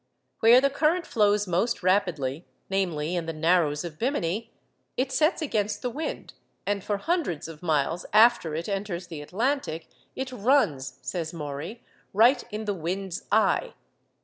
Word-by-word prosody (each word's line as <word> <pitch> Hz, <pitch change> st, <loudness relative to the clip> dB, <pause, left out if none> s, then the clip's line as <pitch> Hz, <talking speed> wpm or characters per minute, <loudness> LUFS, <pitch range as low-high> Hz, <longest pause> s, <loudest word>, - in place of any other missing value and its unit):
Where 235 Hz, +3 st, +7 dB
the 275 Hz, +1 st, +2 dB
current 320 Hz, +5 st, +1 dB
flows 210 Hz, -1 st, +2 dB
most 190 Hz, +5 st, 0 dB
rapidly, 175 Hz, -6 st, 0 dB, 0.2 s
namely, 175 Hz, -4 st, 0 dB
in 170 Hz, -2 st, -2 dB
the 165 Hz, -, -2 dB
Narrows 160 Hz, -2 st, +2 dB
of 165 Hz, -2 st, -8 dB
Bemini, 230 Hz, -, -1 dB, 0.5 s
it 255 Hz, +1 st, 0 dB
sets 310 Hz, +4 st, +2 dB
against 215 Hz, -6 st, -1 dB
the 250 Hz, -, -1 dB
wind, 305 Hz, +5 st, -5 dB, 0.3 s
and 200 Hz, -1 st, -1 dB
for 205 Hz, -, -1 dB
hundreds 285 Hz, -, -1 dB
of 160 Hz, -2 st, -10 dB
miles 160 Hz, +1 st, 0 dB
after 215 Hz, -7 st, +5 dB
it 165 Hz, +2 st, -3 dB
enters 195 Hz, -3 st, -3 dB
the 160 Hz, -4 st, -6 dB
Atlantic 190 Hz, -, -2 dB, 0.3 s
'it 265 Hz, 0 st, -4 dB
runs,' 205 Hz, -, +1 dB
says 165 Hz, -3 st, -3 dB
Maury, 150 Hz, +8 st, -6 dB, 0.3 s
'right 240 Hz, +5 st, +5 dB
in 215 Hz, +1 st, -4 dB
the 205 Hz, -, 0 dB
"wind's 185 Hz, +1 st, -4 dB
eye." -, -, +2 dB
195 Hz, 150 wpm, -26 LUFS, 165-240 Hz, 0.5 s, Where